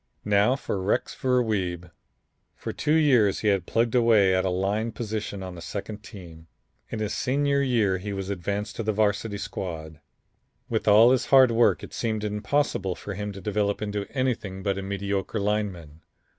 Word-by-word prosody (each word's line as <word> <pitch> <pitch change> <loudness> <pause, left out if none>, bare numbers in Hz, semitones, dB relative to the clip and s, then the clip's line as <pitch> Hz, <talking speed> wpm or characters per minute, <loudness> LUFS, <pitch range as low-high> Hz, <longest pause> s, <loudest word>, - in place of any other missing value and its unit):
"Now 105 +4 +3
for 100 -7 -3
Rex 95 - 0
Ver 125 -1 +1
Wiebe. 90 -5 -2 0.6
For - - -6
two 150 - +1
years 125 -11 +4
he 105 - +2
had 95 -4 +1
plugged 115 0 +1
away 115 -6 +4
at 95 0 +2
a - - +1
line 100 +5 -1
position 105 -3 -4
on 95 -1 -6
the 85 - -10
second 105 +3 -6
team. 85 -6 -12 0.4
In - - -4
his 110 -1 -2
senior 140 +2 +1
year 110 -8 +1
he 100 +2 -5
was 95 0 -4
advanced 100 +3 -3
to - - -1
the 110 0 0
Varsity 105 0 0
squad. 80 -6 -6 0.7
With - - -2
all 110 +4 +7
his 130 - +1
hard 130 -3 +6
work 115 +1 +3
it - - -9
seemed 110 -2 -2
impossible 105 -2 -1
for 100 - -7
him 105 +2 -4
to 100 - -9
develop 100 +1 -1
into 105 -1 -3
anything 115 -8 -2
but 100 -1 -1
a - - -4
mediocre 100 +1 -2
lineman. 100 -7 -2
105 Hz, 180 wpm, -26 LUFS, 95-115 Hz, 0.7 s, all